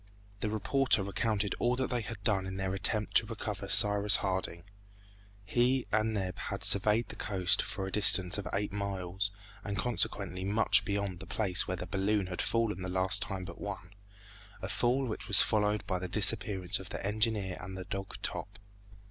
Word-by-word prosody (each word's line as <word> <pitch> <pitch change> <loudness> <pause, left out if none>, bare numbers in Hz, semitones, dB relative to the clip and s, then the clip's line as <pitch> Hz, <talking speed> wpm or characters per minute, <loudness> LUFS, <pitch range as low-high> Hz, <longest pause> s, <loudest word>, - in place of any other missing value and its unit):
The 105 - -2
reporter 110 +1 +1
recounted 100 +1 -1
all 120 +1 +1
that 130 +1 -2
they 120 -1 -1
had 105 -1 -8
done 95 -3 +1
in 95 0 -6
their 95 -1 -2
attempt 105 +2 -1
to - - +2
recover 105 -3 -6
Cyrus 105 +1 +5
Harding. 95 -3 -2 0.8
He 125 +5 +1
and 110 +1 +1
Neb 95 -2 -4
had - - -5
surveyed 105 +3 +4
the - - -7
coast 95 -4 +2
for 95 -1 -5
a 95 - -6
distance 95 -2 +5
of 95 - -6
eight 100 0 -2
miles 100 -1 -2 0.3
and 100 -2 -4
consequently 100 -5 -1
much 100 0 +3
beyond 100 -3 -3
the - - -10
place 95 -4 0
where 95 - -3
the 90 - -5
balloon 100 +2 0
had 90 -1 -4
fallen 115 -5 -1
the 90 - -4
last 95 +1 0
time 95 -2 -4
but - - -10
one, 100 -2 -7 0.7
a 95 - -5
fall 125 +6 +1
which 110 - -6
was 100 - +9
followed 105 -1 0
by 95 -2 -2
the 90 - -5
disappearance 100 -1 +2
of 95 - -9
the - - -6
engineer 105 -2 0
and 95 +1 -8
the 95 - -7
dog 95 +2 -6
Top. 100 +1 -4
100 Hz, 185 wpm, -31 LUFS, 95-110 Hz, 0.8 s, was